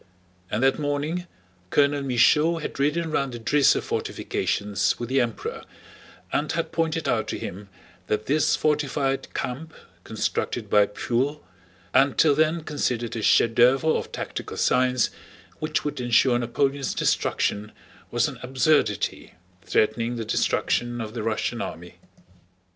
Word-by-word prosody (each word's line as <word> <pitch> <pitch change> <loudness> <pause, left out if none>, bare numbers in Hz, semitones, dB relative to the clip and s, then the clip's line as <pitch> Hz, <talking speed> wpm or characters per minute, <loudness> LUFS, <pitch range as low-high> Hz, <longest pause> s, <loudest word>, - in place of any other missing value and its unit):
And 110 +4 -1
that 135 +2 +3
morning 150 +5 -2 0.4
Colonel 145 +3 +2
Michaud 150 +5 +3
had 155 - -6
ridden 155 +3 0
round 140 -4 -1
the 120 - -6
Drissa 140 +5 +3
fortifications 100 -1 -1
with 120 -1 -4
the 135 0 +3
Emperor 115 -2 -4 0.7
and 150 - 0
had 165 0 -2
pointed 165 -1 -1
out - - 0
to - - -3
him 100 +2 -7 0.4
that 105 0 -1
this 150 +2 +2
fortified 145 -2 0
camp 140 +6 -4 0.3
constructed - - -3
by 105 -1 +5
Pfuel, 130 +8 -1 0.5
and 135 0 +4
till 155 -3 +5
then 155 +2 +1
considered 125 -7 -2
a 115 - -3
chef 115 +2 +4
d'oeuvre 130 +6 +4
of - - -3
tactical - - -6
science 125 -1 +2 0.5
which 155 - -2
would 145 -3 -3
ensure 120 +1 +3
Napoleon's 135 +3 -1
destruction, 105 +1 0 0.4
was - - +1
an - - -8
absurdity, 130 - 0 0.3
threatening 115 +3 +1
the 115 -1 -4
destruction 120 +2 0
of 110 -1 -5
the 120 - -4
Russian 110 0 -2
army. 85 +2 -7
135 Hz, 135 wpm, -25 LUFS, 115-150 Hz, 0.7 s, by